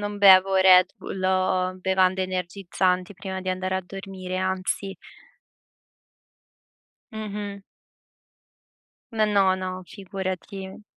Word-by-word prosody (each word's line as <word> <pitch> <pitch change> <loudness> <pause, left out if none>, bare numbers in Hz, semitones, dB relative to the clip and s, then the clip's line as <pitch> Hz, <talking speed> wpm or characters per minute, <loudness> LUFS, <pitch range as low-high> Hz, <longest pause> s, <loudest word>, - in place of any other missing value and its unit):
non 205 0 -4
bevo 190 -1 +7
Red 185 0 +6
Bull 190 - -6
o 185 0 +1
bevande 190 0 +1
energizzanti 185 0 -1
prima 190 0 -6
di 185 - -5
andare 185 0 -2
a 190 - -3
dormire, 190 -1 -7
anzi. 190 +1 -2 2.2
Mh-mh. 205 -2 -6 1.5
No, 220 -1 +2
no, 200 -3 +3
no, 185 0 -5
figurati. 190 0 -6
190 Hz, 100 wpm, -25 LUFS, 185-195 Hz, 2.2 s, bevo